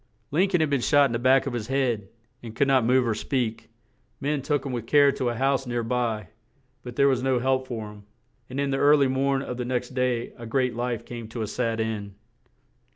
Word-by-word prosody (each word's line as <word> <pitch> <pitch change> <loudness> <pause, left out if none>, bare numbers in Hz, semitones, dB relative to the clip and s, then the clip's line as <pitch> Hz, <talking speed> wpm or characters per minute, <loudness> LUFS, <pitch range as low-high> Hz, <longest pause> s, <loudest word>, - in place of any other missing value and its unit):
Lin 180 +7 +2
coln 180 -4 +2
had 155 - +1
been 140 -3 +1
shot 145 +3 +4
in 135 - -1
the 115 - -1
back 130 +2 +4
of 135 - -3
his 115 -3 -4
head, 120 -7 -1 0.3
and 115 -2 -9
could 140 - +2
not 135 -3 +4
move 125 +1 +3
or 115 - +1
speak; 115 0 -2 0.5
men 145 0 -1
took 145 0 -1
him 135 - -3
with 120 -2 -4
care 145 0 +5
to 130 -3 -2
a 120 - -3
house 135 +1 0
near 120 -1 -1
by, 115 -3 -2 0.5
but 120 -1 -9
there 140 - +4
was 130 -2 +2
no 130 -1 +1
help 130 +1 0
for 110 -4 -5
him; 105 -1 -15 0.4
and 130 +2 -4
in 140 -1 0
the 135 - 0
ear 145 +1 +6
ly 140 - +3
morn 135 +1 0
of 125 - -5
the 125 - -2
next 125 0 -2
day 125 -2 -1
a 115 - -7
great 125 0 0
life 120 -1 -3
came 120 -2 -7
to 115 0 -5
a - - -3
sad 115 0 -2
end. 105 -3 -3
125 Hz, 240 wpm, -25 LUFS, 115-135 Hz, 0.5 s, ear